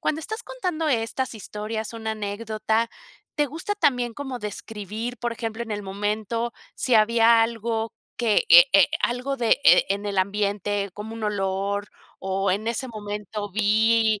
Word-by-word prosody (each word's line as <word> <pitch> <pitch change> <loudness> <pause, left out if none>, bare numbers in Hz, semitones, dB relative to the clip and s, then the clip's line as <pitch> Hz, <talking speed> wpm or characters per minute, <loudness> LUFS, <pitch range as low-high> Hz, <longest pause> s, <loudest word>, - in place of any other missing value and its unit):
Cuando 310 - -1
estás 440 +8 -5
contando 360 -10 -2
estas 245 +1 -1
historias, 215 +1 -5
una 220 -1 -3
anécdota, 220 +2 -1 0.5
¿te 295 -1 +2
gusta 325 +9 -4
también 250 - +1
como 265 -3 -5
describir, 215 +2 -5
por 240 +1 -2
ejemplo, 225 0 -4
en 220 - -5
el 205 - -3
momento 210 +4 -2 0.2
si 255 - +1
había 225 +1 +5
algo 225 0 -2 0.2
que, 235 - +2
eh - - +10
eh, - - +7
algo 250 +3 -1
de, 235 -3 0
eh, 270 - +5
eh, - - +7
en 200 +1 -1
el 200 -1 -3
ambiente 200 +1 0
como 210 +2 -7
un 225 -1 -5
olor? 200 0 -1 0.3
¿O 190 0 0
en 215 +4 -2
ese 235 +3 -2
momento 210 -1 -5
vi 220 +1 +3
220 Hz, 160 wpm, -24 LUFS, 205-235 Hz, 0.5 s, eh